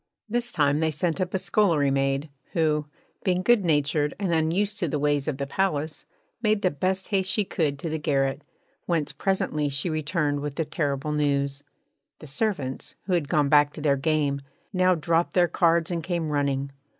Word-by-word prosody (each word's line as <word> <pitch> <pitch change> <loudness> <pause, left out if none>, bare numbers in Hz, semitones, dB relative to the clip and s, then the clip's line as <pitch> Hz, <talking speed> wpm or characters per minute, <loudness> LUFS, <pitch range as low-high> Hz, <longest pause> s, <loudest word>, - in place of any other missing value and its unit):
This 240 +2 -1
time 145 -4 +2
they 160 0 +2
sent 165 +4 -1
up 180 -1 -1
a - - 0
scullery 180 -7 +2
maid; 135 +2 0 0.2
who, 155 -4 +1 0.4
being 185 -1 +1
good 240 -2 +4
natured 145 -2 +1
and 190 -4 -1
unused 180 +6 +1
to 175 - 0
the 150 - -1
ways 145 0 +1
of 150 -4 -1
the 140 - -2
palace, 155 -1 -2 0.3
made 215 -2 +1
the 185 - +3
best 185 +6 -1
haste 190 -2 +1
she 210 0 +1
could 150 -6 -1
to 155 - -5
the 160 0 -2
garret, 140 -1 0 0.4
whence 165 -4 0
presently 150 -6 0
she 140 +5 -2
returned 150 -1 0
with 145 -1 -4
the 160 - -1
terrible 145 -2 -2
news. 140 -1 0 0.5
The - - -12
servants, 145 - -2
who 190 - -2
had 160 -6 0
gone 145 -2 +3
back 145 0 +5
to - - -8
their 145 -2 +3
game, 140 -1 0 0.3
now 185 0 +4
dropped 165 +1 0
their 175 -1 +5
cards 170 0 +2
and 170 -1 -1
came 170 -2 -2
running. 140 -1 0
155 Hz, 185 wpm, -26 LUFS, 145-180 Hz, 0.5 s, back